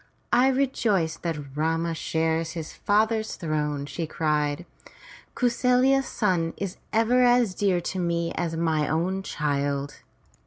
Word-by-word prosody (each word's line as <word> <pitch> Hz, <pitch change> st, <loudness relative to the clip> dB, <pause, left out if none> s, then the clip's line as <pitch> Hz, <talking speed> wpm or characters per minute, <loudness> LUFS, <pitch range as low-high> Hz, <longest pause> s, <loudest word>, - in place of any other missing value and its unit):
"I 245 Hz, +2 st, +5 dB
rejoice 230 Hz, -, +1 dB
that 150 Hz, -5 st, -5 dB
Rama 165 Hz, +2 st, 0 dB
shares 160 Hz, 0 st, -1 dB
his 160 Hz, -2 st, -6 dB
father's 220 Hz, +1 st, +1 dB
throne!" 150 Hz, -3 st, -2 dB
she 150 Hz, +4 st, -4 dB
cried. 150 Hz, 0 st, -1 dB, 0.7 s
'*Kau 250 Hz, -, 0 dB
sarya's 250 Hz, +2 st, +3 dB
son 175 Hz, -6 st, 0 dB
is 195 Hz, -2 st, -4 dB
even 230 Hz, +3 st, +3 dB
as 245 Hz, -4 st, +4 dB
dear 190 Hz, -2 st, +1 dB
to 185 Hz, +2 st, -4 dB
me 170 Hz, -1 st, -1 dB
as 165 Hz, -1 st, -2 dB
mine 160 Hz, -2 st, +1 dB
own 180 Hz, +5 st, 0 dB
child. 140 Hz, -4 st, -2 dB
170 Hz, 130 wpm, -25 LUFS, 155-220 Hz, 0.7 s, I